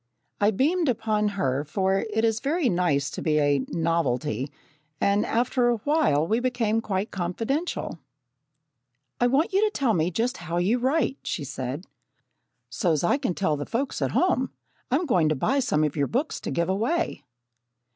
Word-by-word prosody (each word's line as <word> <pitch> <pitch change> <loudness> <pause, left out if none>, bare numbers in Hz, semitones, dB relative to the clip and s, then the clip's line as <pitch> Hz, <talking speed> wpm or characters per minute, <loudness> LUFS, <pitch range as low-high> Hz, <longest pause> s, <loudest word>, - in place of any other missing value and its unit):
I 205 - +4
beamed 300 - +1
upon 215 -3 +1
her, 135 -4 0
for 190 +5 0
it 220 +2 +1
is 225 -1 +1
very 290 +1 +1
nice 165 -7 +1
to - - -5
be 155 -1 +1
a 145 -1 +3
"novelty," 155 -5 -1 0.5
and 200 +1 +2
after 240 +1 +1
a 240 - +3
while 220 - +2
we 220 +7 +1
became 240 -3 0
quite 200 -1 -2
confidential. 225 - -2 1.2
"I 245 - +4
want 280 +9 +1
you 395 +2 +3
to 430 - +3
tell 270 - +1
me 165 -2 +1
just 230 +7 -1
how 170 0 -4
you 200 +8 +2
write," 270 +2 +1
she 150 - -3
said, 135 +3 -5 0.8
"so's 155 +6 0
I 270 +11 +2
can 255 -11 -1
tell 160 -6 +1
the 145 - -4
folks 260 - -2
at - - +1
home. 305 -8 +2 0.4
I'm 290 +8 +1
going 175 - +3
to 155 - +1
buy 270 - +1
some 155 - +1
of 150 -2 0
your 145 -2 +1
books 275 +7 -1
to - - -4
give 170 0 0
away." 240 - -1
210 Hz, 175 wpm, -26 LUFS, 160-255 Hz, 1.2 s, I